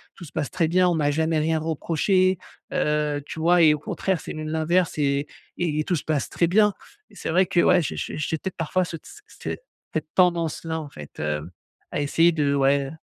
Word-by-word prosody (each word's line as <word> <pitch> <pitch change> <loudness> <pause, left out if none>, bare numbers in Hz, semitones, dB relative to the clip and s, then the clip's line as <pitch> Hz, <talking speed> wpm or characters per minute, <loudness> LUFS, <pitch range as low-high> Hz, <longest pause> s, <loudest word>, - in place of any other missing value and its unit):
tout 175 - -10
se 145 - -13
passe 145 -4 -2
très 165 -3 +1
bien. 180 +2 +3
On 175 - +1
m'a 145 -2 +1
jamais 160 +1 +1
rien 160 +1 +1
reproché, 170 +4 +1 0.3
heu, 150 -1 0
tu 160 - -7
vois? 175 +2 +4
Et 155 -2 +7
au 150 - -8
contraire, 185 +3 -2
c'est - - -7
même 155 0 -5
l'inverse 160 +2 +1
et 140 0 +1 0.3
et 155 -3 0
tout 180 - +1
se 145 - -3
passe 150 -4 -1
très 170 - +1
bien 210 +2 +4 0.4
et - - -18
c'est - - -5
vrai 185 +3 +4
que 175 - 0
ouais 180 - +5
j'ai - - -3
j'ai - - -4
j'ai 155 +1 -1
peut-être 190 +3 -6
parfois 170 +3 0
ce 165 -1 -5
tss 420 - -14 0.2
tss - - -14
ce - - -2 0.4
cette 155 -1 -2
tendance-là 165 -2 +1
en 145 - -9
fait, 75 - -11
hem, 75 +2 -3 0.4
à - - -1
essayer 165 +4 +3
de 145 -3 +1
ouais, 140 0 +2
heu - - -9
160 Hz, 230 wpm, -24 LUFS, 150-175 Hz, 0.4 s, Et